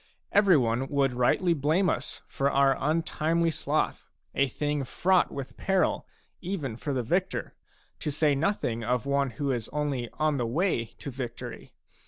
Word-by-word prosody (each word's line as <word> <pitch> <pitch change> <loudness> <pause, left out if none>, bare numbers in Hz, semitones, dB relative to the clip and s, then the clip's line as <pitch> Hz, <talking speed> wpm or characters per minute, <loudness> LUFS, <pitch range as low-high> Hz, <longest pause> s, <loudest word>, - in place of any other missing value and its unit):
Every 200 -5 +6
one 120 +1 +1
would 135 -2 +1
rightly 125 +8 +3
blame 160 +6 +2
us - - -2
for 140 0 0
our 140 -1 +4
untimely 165 +2 +1
sloth, 155 -1 -1 0.2
a 140 - +2
thing 145 +2 -1
fraught 180 +7 +2
with 135 -1 -7
peril 190 -1 +1 0.3
even 170 - -3
for 145 +5 -4
the 130 -3 0
victor, 180 - -1 0.5
to 155 - -2
say 150 0 +2
nothing 140 - 0
of 125 +2 0
one 140 -1 +1
who 140 -2 0
is 120 -4 -3
only 140 -5 -2
on 155 -2 +1
the 120 -3 -1
way 145 -1 +1
to 140 +5 -9
victory. 120 -2 -7
140 Hz, 160 wpm, -28 LUFS, 130-165 Hz, 0.5 s, Every